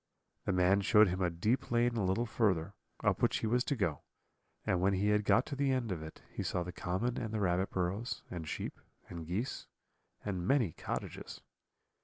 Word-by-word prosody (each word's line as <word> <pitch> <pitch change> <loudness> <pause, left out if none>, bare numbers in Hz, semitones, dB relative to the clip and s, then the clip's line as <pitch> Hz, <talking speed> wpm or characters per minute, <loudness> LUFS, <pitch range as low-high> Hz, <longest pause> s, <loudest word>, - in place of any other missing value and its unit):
The - - +1
man 95 +2 +4
showed 105 0 +6
him 90 +2 -2
a 90 - +3
deep 105 +10 0
lane 120 0 +2
a 110 - 0
little 95 +6 +1
further, 100 -7 +1 0.3
up - - +2
which - - +3
he - - -2
was 120 +3 +2
to 140 - 0
go, 85 - -1 0.6
and 90 - +1
when 100 +2 +3
he 100 +3 +2
had 105 0 +3
got 115 +4 +4
to 140 - -5
the 140 0 +1
end 125 -5 0
of 85 -4 -3
it, 80 0 -9
he - - -3
saw 90 - -1
the 90 - -5
common 95 +7 -1
and 110 -3 -3
the 110 - -1
rabbit 95 -1 +1
burrows, 95 +6 -2
and 85 -3 -5
sheep, - - -4 0.3
and 85 -2 -7
geese, 105 +10 -3 0.6
and 95 -3 -2
many 125 - +3
cottages. - - -5
100 Hz, 205 wpm, -33 LUFS, 90-115 Hz, 0.6 s, showed